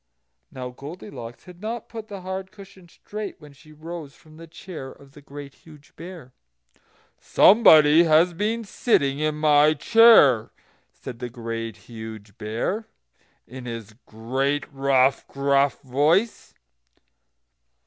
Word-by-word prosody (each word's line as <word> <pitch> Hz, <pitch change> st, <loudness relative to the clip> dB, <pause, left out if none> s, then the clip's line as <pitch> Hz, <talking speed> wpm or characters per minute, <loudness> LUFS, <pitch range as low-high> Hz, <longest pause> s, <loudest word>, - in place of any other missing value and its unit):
Now 125 Hz, -1 st, -7 dB
Goldilocks 135 Hz, -, -10 dB
had 180 Hz, -1 st, -15 dB
not 225 Hz, +1 st, -5 dB
put 225 Hz, -2 st, -9 dB
the 200 Hz, -3 st, -8 dB
hard 190 Hz, +1 st, -6 dB
cushion 195 Hz, -3 st, -15 dB
straight 210 Hz, +3 st, -8 dB
when 150 Hz, -2 st, -15 dB
she 155 Hz, +3 st, -19 dB
rose 155 Hz, -1 st, -9 dB
from 155 Hz, 0 st, -19 dB
the 165 Hz, 0 st, -12 dB
chair 160 Hz, -5 st, -9 dB
of 140 Hz, 0 st, -18 dB
the 145 Hz, -, -16 dB
Great 140 Hz, -1 st, -11 dB
Huge 150 Hz, -3 st, -19 dB
Bear. 165 Hz, -8 st, -11 dB, 0.9 s
"SOMEBODY 160 Hz, -7 st, +6 dB
HAS 165 Hz, +3 st, +4 dB
BEEN 215 Hz, +6 st, -2 dB
SITTING 140 Hz, -, 0 dB
IN 155 Hz, 0 st, -1 dB
MY 150 Hz, 0 st, +4 dB
CHAIR!" 150 Hz, -, +5 dB, 0.4 s
said 125 Hz, -3 st, -10 dB
the 125 Hz, -, -5 dB
Great 115 Hz, -2 st, -6 dB
Huge 110 Hz, -1 st, -11 dB
Bear, 115 Hz, -, -3 dB, 0.6 s
in 130 Hz, +1 st, -10 dB
his 115 Hz, -3 st, -7 dB
great, 135 Hz, +6 st, -2 dB
rough, 135 Hz, -1 st, +2 dB
gruff 140 Hz, 0 st, +1 dB
voice. 155 Hz, -, 0 dB
145 Hz, 130 wpm, -23 LUFS, 130-180 Hz, 0.9 s, SOMEBODY